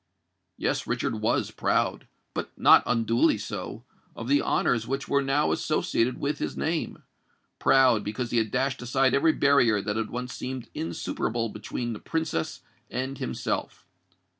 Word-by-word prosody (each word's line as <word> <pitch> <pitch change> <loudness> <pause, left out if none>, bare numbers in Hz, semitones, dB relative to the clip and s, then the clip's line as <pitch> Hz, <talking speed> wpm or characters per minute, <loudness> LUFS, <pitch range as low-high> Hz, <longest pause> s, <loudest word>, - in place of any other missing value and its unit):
Yes: - - -1
Richard - - -1
was - - +1
proud—but - - -2
not - - +7
unduly 115 -1 +3
so—of 115 - -8
the 140 +2 +4
honours 115 -2 +1
which 135 +2 -2
were 140 0 +2
now 140 +2 +1
associated 125 -5 0
with 145 +1 -1
his - - -3
name;—proud, 135 -6 0
because 115 +3 -3
he 120 - +3
had 110 -1 0
dashed 130 +2 -1
aside 130 +1 +2
every 150 +4 +4
barrier 125 -7 +4
that 105 +2 -2
had 110 -1 -2
once 125 +1 -5
seemed 130 -1 -5
insuperable 115 +7 -2
between 115 +3 -4
the 105 - -7
Princess 160 - -2 0.3
and 130 +1 -3
himself. 65 - -3
125 Hz, 140 wpm, -27 LUFS, 115-135 Hz, 0.3 s, not